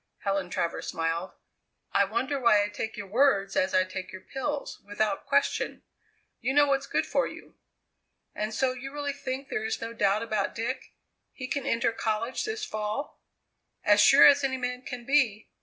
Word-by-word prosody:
Helen 195 -2 -1
Travers 170 -2 -2
smiled. 165 +2 -2 0.6
"I 200 - +4
wonder 260 +7 -1
why 225 -5 +5
I 205 - -2
take 220 +2 -5
your 205 - -5
words 200 -3 +2
as 185 - +1
I 185 - +5
take 185 -1 -7
your 190 - -9
pills, 280 +2 -3
without 205 0 -2
question?" 280 0 0 0.6
"You 265 - -1
know 290 0 +7
what's 275 -1 0
good - - 0
for - - +1
you." - - -11 0.8
"And 215 +1 -3
so 260 +3 +1
you 260 +2 -7
really 285 -1 -3
think 270 -1 -5
there 215 - -2
is 220 - -2
no 230 0 -5
doubt 205 -1 +2
about 215 -3 -1
Dick? 255 +3 -4 0.4
He 255 - -6
can 280 0 -3
enter 230 0 +2
college 225 +2 -2
this 435 0 -3
fall?" 215 - -4 0.6
"As 205 -1 +5
sure 275 +5 +8
as 285 0 +7
any 265 -1 0
man 250 0 -3
can 250 -2 -7
be. 245 -6 +2
230 Hz, 180 wpm, -28 LUFS, 205-270 Hz, 0.8 s, sure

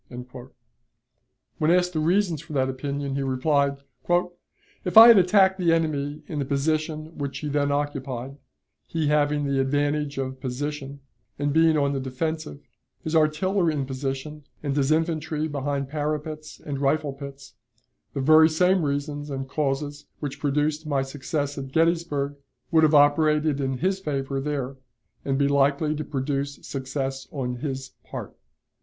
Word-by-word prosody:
When 155 - +2
asked 180 +1 +3
the 155 - 0
reasons 170 -1 +1
for 170 -2 -10
that 130 -2 +1
opinion, 140 +1 -3
he 140 - -1
replied: 140 +1 +1 1.1
"If 180 - 0
I 230 +1 +12
had 230 -4 +9
attacked 190 +1 +4
the 170 -2 +3
enemy 150 -2 -1
in 150 -1 -4
the 140 - -1
position 155 +3 -1
which 140 -1 -3
he 150 - -4
then 145 0 +1
occupied 140 -2 -3 0.5
he 160 -3 -1
having 150 -1 +2
the 140 -1 0
advantage 145 +1 0
of 130 -1 -4
position, 140 +2 -4 0.4
and 145 0 0
being 160 0 +4
on 140 -1 +1
the 135 - -1
defensive, 145 +3 -4 0.4
his 160 -1 -2
artillery 160 +2 +2
in 140 -2 -1
position, 135 +3 -4 0.2
and 140 -2 -1
his 140 0 +1
infantry 155 -1 0
behind 140 -1 -2
parapets 150 +1 -4
and 140 -2 -5
rifle 145 +1 +1
pits 140 0 -10 0.6
the 140 - -1
very 155 +3 +7
same 180 +2 +3
reasons 145 +1 -2
and 135 -1 -4
causes 145 +1 -2
which 145 -3 -5
produced 150 +2 0
my 140 -3 +1
success 145 +1 -3
at 135 -1 -7
Gettysburg 160 -3 +1 0.3
would 160 -1 +5
have 155 -1 +4
operated 150 0 +4
in 135 -1 -1
his 190 +6 0
favor 135 -5 -2
there, 135 -2 -3 0.5
and 135 -1 0
be 140 0 +3
likely 140 +2 +2
to 155 - -3
produce 140 0 -2
success 135 0 -4
on 125 -3 -3
his 135 0 -5
part." - - -8
145 Hz, 150 wpm, -25 LUFS, 140-155 Hz, 1.1 s, I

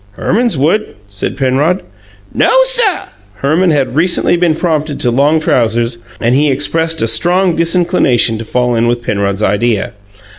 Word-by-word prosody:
"Herman's 225 - -1
would," 170 +11 0
said 100 +5 -5
Penrod. 140 +7 0 0.5
"No, - - +2
suh!" 485 -7 +1 0.3
Herman 155 - +1
had 140 -4 0
recently 175 +2 +2
been 170 -2 +1
promoted 155 -3 -2
to 120 - +1
long 145 +6 +2
trousers, 115 -4 0 0.2
and 120 +1 0
he 145 +3 +2
expressed 160 +3 0
a - - +1
strong 175 +8 +1
disinclination 165 - +1
to - - -5
fall 125 +2 -1
in 115 0 +1
with 120 0 -1
Penrod's 100 -1 -2
idea. 110 +2 0
145 Hz, 150 wpm, -12 LUFS, 120-170 Hz, 0.5 s, No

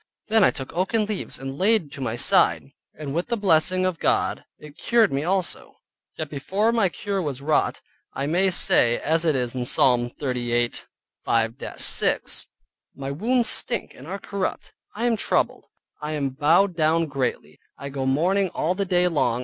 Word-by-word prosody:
Then 220 -1 +4
I - - +6
took 135 -3 -7
oaken 190 +5 0
leaves 210 -2 -4
and 135 +1 -7
laid 195 -6 +2
to 140 - -9
my 120 -3 -2
side, 80 -10 +2 0.2
and 145 -2 -6
with 170 +3 -2
the 235 -1 -1
blessing 185 -1 +3
of 185 -3 -2
God - - 0
it 150 -1 -13
cured 225 0 +2
me 140 +2 -1
also; 185 +1 -2 0.4
yet 155 - -4
before 190 +10 -1
the 225 -5 +2
cure 200 +2 -3
was 145 -6 -4
wrought, 150 +2 0 0.3
I 135 - -2
may 180 +6 +2
say, 120 -9 +3
as 165 +2 0
it 155 -3 +2
is 125 -2 -1
in 125 -1 -3
Psalm 120 -1 +4
38.5 120 -2 -3
6 - - 0 0.5
"My 135 0 -5
wounds 235 - +1
stink 235 -5 0
and 130 - -13
are 190 +3 -4
corrupt, 200 -1 -4 0.2
I 230 +3 -2
am 235 -2 +2
troubled, - - -1 0.3
I 150 +1 -4
am 140 -3 -1
bowed 165 +8 +2
down 165 +1 +2
greatly, 140 -4 -4 0.2
I 140 - -7
go 135 -1 -3
mourning 180 +8 +1
all 170 - 0
the 200 +1 -2
day 180 -1 +2
long." 125 -8 +1
155 Hz, 175 wpm, -24 LUFS, 135-195 Hz, 0.5 s, I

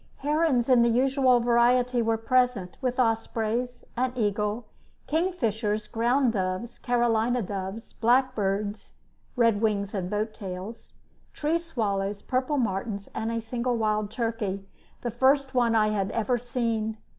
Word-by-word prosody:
Herons 295 -4 +1
in 250 -3 +5
the 235 - +4
usual 260 +1 +3
variety 245 +1 +3
were 225 0 +1
present, 230 -5 +1
with 255 -1 -1
ospreys, 230 +1 -1
an 250 +1 0
eagle, 210 0 -1 0.4
kingfishers, 230 - -1
ground 240 +3 +1
doves, 185 +3 -3
Carolina 240 0 +1
doves, 195 +3 -6
blackbirds 215 -4 0 0.4
(red 230 -4 +3
wings 205 -3 0
and 185 -3 -2
boat 215 +2 -2
tails), 195 +3 -8 0.4
tree 315 +3 0
swallows, 205 -11 -2
purple 260 +3 0
martins, 200 -3 -2
and 225 +1 -2
a 230 - -1
single 240 +2 -2
wild 215 -2 0
turkey, 220 -4 -3 0.3
the 240 - -3
first 265 +3 +2
one 240 -2 +3
I 215 -1 +4
had 200 -2 -1
ever 235 +2 0
seen. 230 -3 -2
230 Hz, 135 wpm, -27 LUFS, 210-250 Hz, 0.4 s, in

